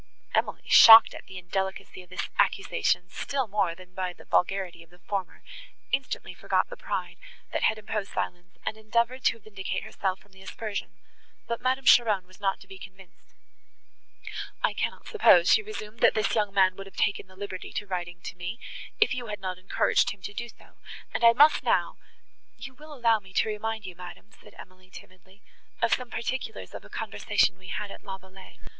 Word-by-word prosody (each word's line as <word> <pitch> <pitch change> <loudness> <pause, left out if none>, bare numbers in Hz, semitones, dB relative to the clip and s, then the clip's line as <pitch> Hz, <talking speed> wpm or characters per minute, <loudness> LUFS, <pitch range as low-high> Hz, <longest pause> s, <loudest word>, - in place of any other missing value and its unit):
Emily, - - 0
shocked 225 0 +10
at - - -11
the 190 - -9
indelicacy 190 +1 -4
of 180 - -18
this 185 - -4
accusation, 130 - +1
still 275 -2 -2
more 195 -5 0
than 185 0 -15
by 185 -1 -3
the - - -17
vulgarity 180 -2 0
of 165 - -17
the 175 - -20
former, 190 0 -5 0.5
instantly 270 0 -2
forgot - - 0
the - - -5
pride, - - -4 0.4
that - - 0
had 220 - +3
imposed 210 -1 -4
silence, 180 +1 -5
and 220 - -2
endeavoured 235 +4 0
to - - +3
vindicate 200 -3 -5
herself 190 -2 -2
from 205 - -25
the 190 0 -17
aspersion, 205 +2 -5 0.6
but 235 0 -3
Madame 260 +1 0
Cheron 215 -7 +5
was 185 0 -19
not 195 -1 0
to - - -15
be 190 - -11
convinced. 190 -1 -15 1.3
"I - - +2
cannot - - -3
suppose," 440 -2 +5
she 445 - +6
resumed, 230 - -8
"that - - +5
this 215 -2 +1
young 210 -2 +1
man 190 -2 +4
would 195 0 -8
have 195 - -15
taken 200 -1 0
the 185 - -18
liberty 190 -1 -7
of 205 -2 -14
writing 175 -1 -4
to - - -6
me, 180 +6 -6 0.4
if 440 - +4
you 245 -2 -4
had 210 -1 -5
not 185 -1 -4
encouraged 185 - +2
him 200 -1 -8
to 205 - -6
do 235 +3 -5
so, - - -20 0.4
and - - -2
I 230 0 +8
must 295 +5 +6
now" - - +1 0.6
"You 265 - -9
will 305 +4 -14
allow 235 -6 +2
me 190 -2 -17
to - - +2
remind 220 0 -3
you, 185 - -7
madam," 180 +4 -11
said - - -17
Emily 185 0 -14
timidly, 190 +2 -16 0.4
"of 230 - +2
some 250 -1 -1
particulars 255 +3 -4
of - - -8
a - - -15
conversation 190 -1 0
we 185 - -13
had 210 +1 -4
at - - -11
La 195 -2 -6
Vallée. 190 0 -15
200 Hz, 195 wpm, -27 LUFS, 185-225 Hz, 1.3 s, shocked